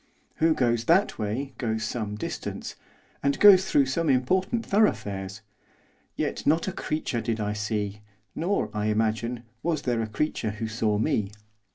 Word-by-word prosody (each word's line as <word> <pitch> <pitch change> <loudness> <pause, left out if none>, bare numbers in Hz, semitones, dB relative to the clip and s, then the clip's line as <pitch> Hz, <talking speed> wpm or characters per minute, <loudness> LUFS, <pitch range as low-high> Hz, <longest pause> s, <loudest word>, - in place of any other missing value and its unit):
Who 160 0 +3
goes 120 -2 +1
that 190 +5 +3
way 120 +6 -3
goes 110 -2 -1
some 105 -1 -3
distance, 105 - -5 0.5
and 140 0 0
goes 190 -2 +8
through 140 - +4
some 160 +4 0
important 185 - +1
thoroughfares; 100 - 0 0.7
yet - - -2
not 160 +5 +3
a - - 0
creature 155 -9 -2
did 115 0 -2
I 105 0 -1
see, 105 -1 -3 0.3
nor, 185 +5 -1
I 105 0 -1
imagine, 110 +2 0 0.2
was 160 -3 -1
there 120 -4 0
a 110 - -2
creature 110 0 -1
who 110 0 -3
saw 110 -1 0
me. 105 -1 0
115 Hz, 155 wpm, -26 LUFS, 110-155 Hz, 0.7 s, goes